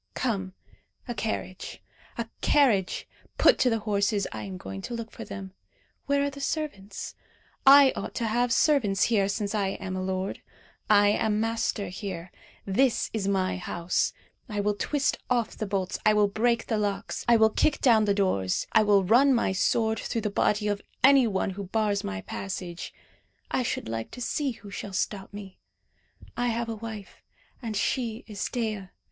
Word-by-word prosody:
Come! 195 Hz, -7 st, -2 dB, 0.5 s
a 240 Hz, -, -2 dB
carriage, 195 Hz, -5 st, -4 dB, 0.4 s
a 235 Hz, -1 st, -3 dB
carriage! 230 Hz, -11 st, +2 dB, 0.3 s
put -, -, +5 dB
to 255 Hz, -, +4 dB
the 225 Hz, -, +1 dB
horses. 205 Hz, -1 st, 0 dB
I 110 Hz, -, -5 dB
am 95 Hz, -2 st, -6 dB
going 95 Hz, +1 st, -7 dB
to 240 Hz, -, -5 dB
look 230 Hz, -1 st, -6 dB
for 230 Hz, -, -8 dB
them. 195 Hz, -2 st, -8 dB, 0.5 s
Where 280 Hz, 0 st, +2 dB
are 285 Hz, -, -1 dB
the 280 Hz, 0 st, -9 dB
servants? 275 Hz, -11 st, -4 dB, 0.5 s
I 275 Hz, -1 st, +9 dB
ought -, -, -5 dB
to 235 Hz, -, -1 dB
have 240 Hz, +2 st, +1 dB
servants 230 Hz, -8 st, +3 dB
here, 200 Hz, -4 st, +2 dB
since 205 Hz, 0 st, -2 dB
I 195 Hz, -2 st, -1 dB
am 185 Hz, -1 st, -4 dB
a 185 Hz, -, -2 dB
lord. 190 Hz, +1 st, -3 dB, 0.5 s
I 205 Hz, -1 st, +6 dB
am 210 Hz, 0 st, +1 dB
master 225 Hz, -2 st, -1 dB
here. 180 Hz, -2 st, -6 dB, 0.3 s
This 235 Hz, +6 st, +1 dB
is 210 Hz, -3 st, -1 dB
my 190 Hz, -2 st, +1 dB
house. 175 Hz, -1 st, -1 dB, 0.4 s
I 210 Hz, -1 st, -3 dB
will 205 Hz, +1 st, +1 dB
twist 285 Hz, +7 st, 0 dB
off 240 Hz, -3 st, 0 dB
the 215 Hz, -, -4 dB
bolts, 190 Hz, -2 st, -2 dB
I 215 Hz, 0 st, +4 dB
will 210 Hz, -1 st, +4 dB
break 230 Hz, +3 st, +1 dB
the 220 Hz, -2 st, -1 dB
locks, 205 Hz, -1 st, -2 dB
I 240 Hz, -, +6 dB
will 220 Hz, 0 st, +5 dB
kick 295 Hz, +6 st, +2 dB
down 225 Hz, -4 st, +5 dB
the 200 Hz, -1 st, +2 dB
doors, 100 Hz, -, +1 dB
I 220 Hz, -, +5 dB
will 205 Hz, -2 st, +4 dB
run 250 Hz, +8 st, +5 dB
my 235 Hz, -, +1 dB
sword 220 Hz, +3 st, +1 dB
through 230 Hz, -, -2 dB
the 210 Hz, -1 st, -2 dB
body 210 Hz, +1 st, +1 dB
of 205 Hz, -1 st, -1 dB, 0.2 s
any 270 Hz, -2 st, +7 dB
one 195 Hz, -1 st, -1 dB
who 200 Hz, +1 st, -6 dB
bars 205 Hz, +1 st, 0 dB
my 95 Hz, -1 st, -4 dB
passage. 170 Hz, -, -6 dB, 0.6 s
I -, -, +1 dB
should 240 Hz, -, -2 dB
like 115 Hz, 0 st, -4 dB
to -, -, -7 dB
see 275 Hz, +2 st, -1 dB
who 205 Hz, -2 st, -13 dB
shall 200 Hz, 0 st, -6 dB
stop 195 Hz, +1 st, -2 dB
me. 200 Hz, -2 st, -10 dB, 0.8 s
I 245 Hz, 0 st, 0 dB
have 235 Hz, 0 st, -1 dB
a 225 Hz, -, -3 dB
wife, 215 Hz, -2 st, -8 dB, 0.4 s
and 225 Hz, -4 st, -3 dB
she 230 Hz, 0 st, -1 dB
is 205 Hz, -3 st, -5 dB
Dea. 215 Hz, -6 st, -3 dB
210 Hz, 180 wpm, -27 LUFS, 195-235 Hz, 0.8 s, I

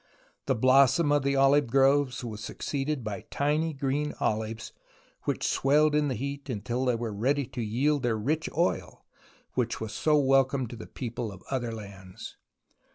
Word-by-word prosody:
The -, -, +2 dB
blossom 135 Hz, +5 st, +4 dB
of 145 Hz, 0 st, +3 dB
the 140 Hz, +1 st, 0 dB
olive 135 Hz, 0 st, +4 dB
groves 135 Hz, +1 st, +3 dB
was 110 Hz, -3 st, -6 dB
succeeded 140 Hz, +4 st, -3 dB
by 105 Hz, -2 st, -5 dB
tiny 150 Hz, +3 st, 0 dB
green 145 Hz, +1 st, -2 dB
ohves 110 Hz, +1 st, -2 dB, 0.5 s
which -, -, -1 dB
swelled 150 Hz, +2 st, +3 dB
in 150 Hz, 0 st, +2 dB
the 130 Hz, -, -1 dB
heat 140 Hz, +4 st, -5 dB
until 120 Hz, +3 st, -2 dB
they 125 Hz, -2 st, +2 dB
were 115 Hz, -2 st, -3 dB
ready 135 Hz, +7 st, 0 dB
to 120 Hz, -, -5 dB
yield 135 Hz, +7 st, +1 dB
their 120 Hz, -3 st, 0 dB
rich 150 Hz, +9 st, -1 dB
oil 170 Hz, -, -1 dB, 0.5 s
which 120 Hz, -2 st, -1 dB
was 110 Hz, -1 st, -5 dB
so 150 Hz, +6 st, +2 dB
welcome 135 Hz, -1 st, +3 dB
to 120 Hz, -, -7 dB
the 110 Hz, -, -9 dB
people 120 Hz, -3 st, -5 dB
of 95 Hz, -1 st, -12 dB
other 120 Hz, -3 st, -1 dB
lands. 100 Hz, -1 st, -9 dB
130 Hz, 165 wpm, -28 LUFS, 115-145 Hz, 0.5 s, blossom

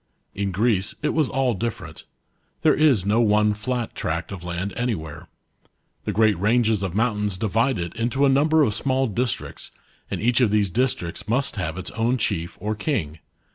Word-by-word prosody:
In 100 Hz, 0 st, -2 dB
Greece 100 Hz, 0 st, +1 dB
it 150 Hz, -, +2 dB
was 155 Hz, -4 st, +1 dB
all 130 Hz, -2 st, +1 dB
different. 115 Hz, +3 st, -5 dB, 0.6 s
There -, -, +5 dB
is 135 Hz, -11 st, +3 dB
no 110 Hz, +4 st, +3 dB
one 105 Hz, -1 st, +3 dB
flat 120 Hz, +2 st, -3 dB
tract -, -, -3 dB
of 95 Hz, -3 st, -7 dB
land 90 Hz, +3 st, -4 dB
anywhere. 105 Hz, -12 st, -3 dB, 0.8 s
The -, -, -1 dB
great 105 Hz, -3 st, +3 dB
ranges 110 Hz, 0 st, +2 dB
of 95 Hz, -2 st, -3 dB
mountains 105 Hz, -3 st, 0 dB
divide 115 Hz, +6 st, +1 dB
it 85 Hz, -1 st, -4 dB
into 120 Hz, +5 st, +1 dB
a -, -, +5 dB
number 150 Hz, +3 st, +4 dB
of 110 Hz, -7 st, +1 dB
small 130 Hz, +4 st, +1 dB
districts, 120 Hz, +2 st, -3 dB, 0.4 s
and -, -, -3 dB
each 120 Hz, +3 st, +2 dB
of 120 Hz, -, +4 dB
these 105 Hz, -2 st, +1 dB
districts 100 Hz, -7 st, -1 dB
must 130 Hz, +4 st, 0 dB
have 85 Hz, -2 st, -3 dB
its 95 Hz, -, -6 dB
own 115 Hz, +3 st, 0 dB
chief 90 Hz, -7 st, -2 dB
or 105 Hz, +3 st, -2 dB
king. 85 Hz, -, -2 dB
110 Hz, 175 wpm, -23 LUFS, 95-125 Hz, 0.8 s, There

